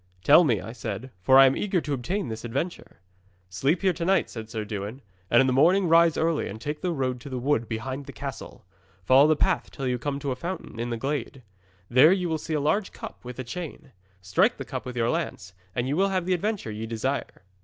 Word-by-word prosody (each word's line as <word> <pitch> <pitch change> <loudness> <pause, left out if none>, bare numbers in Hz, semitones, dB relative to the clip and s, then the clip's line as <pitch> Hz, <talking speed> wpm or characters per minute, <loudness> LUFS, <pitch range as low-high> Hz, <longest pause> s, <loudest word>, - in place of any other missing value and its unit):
'"Tell 150 +5 +7
me," 120 - +2
I 115 - -7
said, 115 +1 -6
"for 130 +8 +5
I 135 - +10
am 135 - +3
eager 195 -3 0
to 150 -3 -3
obtain 170 +8 -2
this 110 -1 -6
adventure." 135 - -5 0.5
'"Sleep 135 - 0
here 190 -2 +3
to 170 +1 -5
night," 190 +3 +2
said 110 -2 -7
Sir 110 -1 -4
Dewin, 105 +5 -6 0.3
"and 120 - +6
in - - +3
the 130 - +1
morning 175 +8 +4
rise 165 0 +5
early, 160 -1 0
and 110 - -7
take 150 +6 -5
the 180 - -1
road 130 -5 -2
to 140 - -9
the 130 - -4
wood 120 -3 0
behind 130 +5 -4
the - - -7
castle. - - -8 0.4
Follow 135 +6 +6
the 155 - +4
path 185 +3 0
till 135 - -6
you 125 -1 -1
come 140 +2 -2
to 140 -1 -3
a - - -1
fountain 170 -4 -6
in 120 +1 -3
a 115 - -2
glade. 135 0 -4 0.4
There 130 - +6
you 180 -2 +1
will 160 -1 -1
see 160 +1 -3
a - - +1
large 170 +8 0
cup, - - -10
with 125 -1 -8
a 130 - -4
chain. 155 +1 -7 0.3
Strike 95 0 +2
the - - -6
cup - - -6
with 125 -1 -6
your 115 0 +2
lance, 155 - -4 0.2
and 125 +1 -1
you 140 - 0
will 195 +3 +2
have 185 -2 -1
the 185 - +1
adventure 195 - -2
ye 110 +1 -5
desire." 115 0 -3
135 Hz, 240 wpm, -26 LUFS, 120-165 Hz, 0.5 s, I